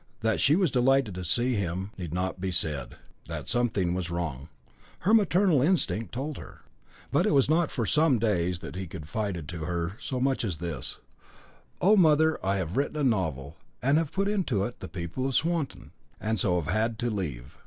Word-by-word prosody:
That 110 -1 +1
she 145 - +5
was 180 -5 +2
delighted 130 -3 +3
to 90 0 -5
see 120 +8 +1
him 95 -1 -2
need 90 -5 -6
not 90 +1 -2
be 95 - -1
said; 80 -5 -2 0.3
that - - -6
something 105 -8 +1
was 90 -1 -2
wrong, 80 -5 -4 0.5
her 205 +5 +2
maternal 185 - +4
instinct 145 - +1
told 140 +4 -4
her. - - -12 0.5
But - - +3
it - - +3
was 135 - +4
not 160 +2 +2
for 115 - -2
some 150 +1 +3
days 90 -5 +1
that - - -7
he 95 0 -4
confided 85 +1 -4
to 85 -2 -5
her 85 +3 -2
so 130 - -3
much 135 0 +1
as 95 -8 -2
this: 80 -6 -5 0.8
"Oh, 200 +4 +6
mother, 160 -3 +4
I 95 +1 +1
have 95 +2 -3
written 145 +2 0
a 150 - 0
novel, 80 - -1 0.2
and 140 +5 +3
have 165 -3 -2
put 195 0 0
into 180 - 0
it 120 +4 -5
the - - -6
people 90 +9 -4
of 135 - -2
Swanton 165 -4 -1 0.3
and 110 -1 -1
so 90 -1 +2
have 85 +2 -2
had 110 +1 0
to 120 +1 -1
leave." 70 - -5
110 Hz, 195 wpm, -28 LUFS, 90-140 Hz, 0.8 s, Oh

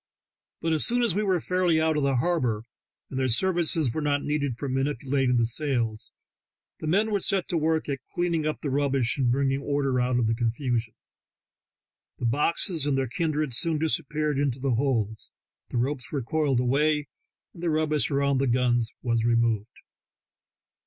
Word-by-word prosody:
But 165 0 0
as 155 - +1
soon 245 +1 +3
as 225 -7 +1
we 210 - +1
were 190 -4 +1
fairly 180 -1 +1
out 160 0 +2
of 150 - +1
the 140 -1 +1
harbor, 125 -6 0 0.5
and 135 - -3
their 130 - +1
services 165 -1 +2
were 155 - -2
not 145 -1 0
needed 145 -5 -1
for 140 - -4
manipulating 135 -1 0
the 115 - +3
sails, 120 -4 -2 0.7
the 155 - -5
men 205 +7 +2
were 205 - +1
set 190 -1 -1
to 170 - 0
work 160 0 0
at 140 -2 -2
clearing 170 -3 0
up 155 - -3
the 145 - -2
rubbish 135 -2 0
and 125 -3 +2
bringing 135 +1 +1
order 140 -3 0
out 125 0 +1
of 120 - +2
the 110 - +1
confusion. 115 0 -1 1.2
The 125 - -4
boxes 150 - +1
and 140 -2 +1
their 135 -1 0
kindred 155 -1 -1
soon 160 +6 +3
disappeared 150 -2 0
into 140 -3 0
the 135 -1 -1
holds, 115 -4 -1 0.3
the - - -3
ropes 125 +1 -2
were 140 -4 -2
coiled 140 0 +1
away, 145 +4 +2 0.5
and 170 - -12
the 175 - 0
rubbish 155 -2 +1
around 140 -1 +1
the 135 - +1
guns 120 -2 +1
was 115 -2 +1
removed. 115 -2 +2
140 Hz, 180 wpm, -26 LUFS, 125-155 Hz, 1.2 s, soon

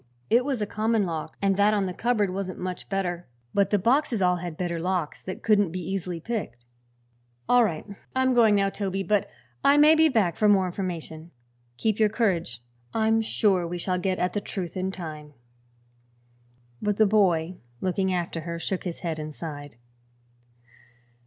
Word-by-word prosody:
It 240 +2 +5
was 270 -3 -1
a - - 0
common 215 0 0
lock 165 -3 -5
and 195 -1 +2
that 205 +1 +4
on 200 -2 +1
the 185 - -3
cupboard 210 -4 0
wasn't 190 -1 -4
much 180 0 -5
better. 180 -3 -2 0.3
But 200 -1 +2
the 205 - +3
boxes 240 +3 +2
all 180 -1 +3
had 175 -2 -6
better 175 -2 -2
locks, 175 -3 -2
that 185 - -7
couldn't 205 -4 +3
be 180 +3 -5
easily 180 -1 -3
picked." 165 - -5 0.8
"All 245 0 +5
right. 170 -8 -2 0.3
I'm 260 0 +3
going 225 -4 +5
now, 195 -1 +2
Toby, 195 -1 -2
but 205 +2 +1 0.3
I 280 +1 +5
may 300 +2 +7
be 320 0 +5
back 205 - +1
for 210 - +4
more 195 -2 +4
information. 170 -3 -5 0.5
Keep 215 - 0
your 215 -1 +4
courage; 175 - -1 0.3
I'm 225 0 +3
sure 195 -5 +1
we 175 +1 -4
shall 180 +1 -1
get 185 0 -1
at 180 0 -1
the 205 - -1
truth 185 -4 -5
in 185 0 -2
time." 155 -5 -8 1.5
But 210 -1 0
the 220 - +5
boy, 185 -4 +2 0.2
looking 190 +1 0
after 175 -2 -2
her, 170 +1 -5
shook 185 +3 -3
his 175 -2 -5
head 165 -3 -3
and 155 0 -5
sighed. 145 -4 -7
190 Hz, 180 wpm, -26 LUFS, 175-210 Hz, 1.5 s, may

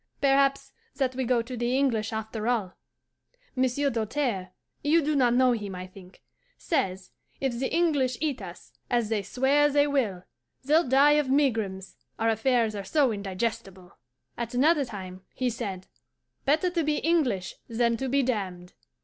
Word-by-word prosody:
Perhaps 275 0 +2 0.2
that 265 -2 0
we 260 0 -2
go 240 -1 +2
to 250 +2 -7
the 240 +2 0
English 230 -6 +1
after 220 0 -4
all. 215 -7 0 0.8
Monsieur 260 +2 +1
Doltaire 225 -4 -2 0.3
you 305 +3 +3
do 300 +1 0
not 245 -3 +3
know 255 0 +4
him, 205 -5 -3
I 180 0 -6
think 185 0 -15 0.3
says, 190 - -2 0.3
"If 255 -3 -2
the 265 - -2
English 285 -8 +1
eat 285 -6 -2
us, 180 -2 -10 0.2
as 240 -3 +1
they 220 -2 0
swear 265 +8 +2
they 290 0 +3
will, 235 -11 -1 0.4
they'll 310 +3 +3
die 290 +3 +5
of 270 - -6
megrims, 225 -9 0 0.2
our 225 - +1
affairs 225 0 +1
are 200 - -4
so 270 +5 +2
indigestible." 195 -2 -4 0.4
At 235 0 -4
another 290 +2 +3
time 185 -5 -8
he 255 -1 0
said, 200 -6 -5 0.6
"Better 315 +6 +2
to 340 -2 0
be 305 0 +1
English 265 - 0 0.2
than 235 0 +1
to 265 +2 -3
be 275 +2 +2
damned." 185 -7 -3
245 Hz, 160 wpm, -27 LUFS, 205-275 Hz, 0.8 s, die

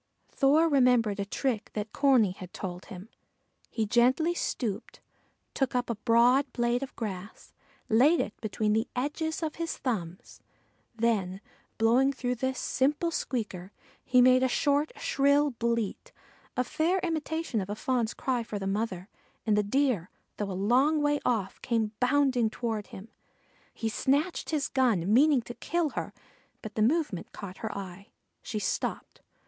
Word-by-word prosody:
Thor 300 +4 +3
remembered 250 -8 +3
a 200 - -1
trick 230 +1 -2
that 210 0 -4
Corney 260 -8 +4
had 185 -1 -10
told 180 -1 -6
him. 190 -1 -10 0.6
He 220 - -1
gently 255 +9 +3
stooped, 225 - -3 0.5
took 270 -2 -1
up 245 -1 0
a - - -2
broad 240 +5 +3
blade 240 +1 +1
of 275 - -6
grass, 200 -2 -7 0.3
laid 275 +10 +4
it 210 - -2
between 215 -1 0
the 220 +2 +1
edges 315 +5 -2
of 310 - -3
his 335 -1 -3
thumbs, 185 -9 -4 0.5
then 210 -5 0 0.4
blowing 240 +5 +4
through 250 -2 -2
this 260 +2 -2
simple 295 +6 0
squeaker 205 - -3 0.3
he 250 0 +4
made 255 0 +6
a 260 - +3
short, 285 +4 +1
shrill 290 - +2
bleat, 235 - -2 0.5
a 250 - +3
fair 320 +8 0
imitation 320 - -2
of 190 - -6
a 205 - -2
Fawn's 240 -1 -1
cry 255 -2 -1
for 220 -2 -5
the 195 - -5
mother, 195 -2 -2 0.4
and 215 -2 +3
the 210 - +3
Deer, 210 - 0 0.3
though 205 -1 -3
a - - -3 0.2
long 290 +5 +4
way 290 0 +2
off, 210 -6 -1
came 225 -3 0
bounding 255 -3 +2
toward 220 -2 -3
him. 200 +4 -11 0.6
He 225 - -4
snatched 285 +9 0
his 300 -3 0
gun, 220 -8 +1
meaning 275 0 +5
to 240 - -8
kill 330 +6 -1
her, - - -4 0.5
but 220 - -7
the 215 - -1
movement 255 - 0
caught 190 -2 -8
her 220 -2 -5
eye. 195 +1 -8 0.3
She 220 - -5
stopped. 210 - -3
240 Hz, 155 wpm, -28 LUFS, 210-275 Hz, 0.6 s, made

